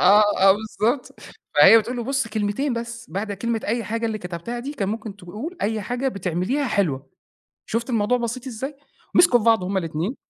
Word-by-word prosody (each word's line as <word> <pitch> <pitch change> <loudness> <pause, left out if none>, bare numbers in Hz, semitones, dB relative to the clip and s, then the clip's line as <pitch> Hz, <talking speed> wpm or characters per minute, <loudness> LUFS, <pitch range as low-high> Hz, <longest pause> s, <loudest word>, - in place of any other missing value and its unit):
آه، 210 +1 +7 0.2
آه 195 +1 +7
بالضبط 220 +5 -2 0.3
فهي 225 - +9
بتقول 240 +3 -3
له: 240 - -3
"بُصّ 265 -2 -1
كلمتين 215 +6 -1
بس، 235 -3 -6
بعد 200 +4 -3
كلمة 225 +3 -2
أي 230 +2 -1
حاجة 230 +3 -2
اللي 215 -1 -2
كتبتها 180 +6 -5
دي 275 +4 -5
كان 200 -7 -2
ممكن 215 -1 -5
تقول 210 - -7
أي 215 +1 0
حاجة 245 +6 -1
بتعمليها 200 - -1
حلوة، 145 -11 -1 0.6
شُفت 235 +3 -2
الموضوع 235 +1 +2
بسيط 240 +2 -4
إزاي؟" 265 +4 -5 0.4
مسكوا 340 -9 +6
في 215 - -4
بعض 225 -4 +4
هُم 195 +2 -2
الاتنين 170 - -2
225 Hz, 185 wpm, -23 LUFS, 200-245 Hz, 0.6 s, فهي